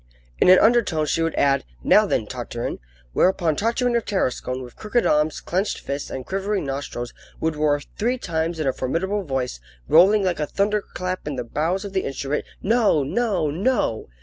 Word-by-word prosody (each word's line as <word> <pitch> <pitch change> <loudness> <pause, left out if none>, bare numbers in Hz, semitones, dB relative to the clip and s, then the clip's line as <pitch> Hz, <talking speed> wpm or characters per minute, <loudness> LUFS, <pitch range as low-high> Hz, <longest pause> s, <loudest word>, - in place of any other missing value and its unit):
In - - +5
an 185 - +9
undertone 210 -10 +3
she 165 - 0
would 165 0 0
add: 140 -1 +2 0.2
"Now, - - +5
then, - - 0
Tartarin!" - - -5 0.3
Whereupon 175 -4 +2
Tartarin 235 - 0
of 235 - +1
Tarascon, 130 -9 -2
with 120 -1 -12
crooked 225 +3 0
arms, 150 +1 +2
clenched 190 +4 -1
fists, 140 +1 -4
and 130 -1 -6
quivering 195 0 -2
nostrils, 135 -3 -4 0.3
would 160 -1 -1
roar 150 -1 +1 0.2
three 245 +4 +1
times 165 -5 -2
in 155 - -1
a 135 - +1
formidable 190 +10 -1
voice, 130 - -3 0.3
rolling 195 +6 +6
like 180 -3 0
a 150 - -1
thunderclap 195 -3 -2
in 145 - -2
the 125 - -3
bowels 165 - -1
of 200 - -7
the 190 - +1
instrument: 140 +2 -3 0.2
"No! 215 - +3
no! 185 - 0
no!" 195 - 0
170 Hz, 175 wpm, -23 LUFS, 145-200 Hz, 0.3 s, an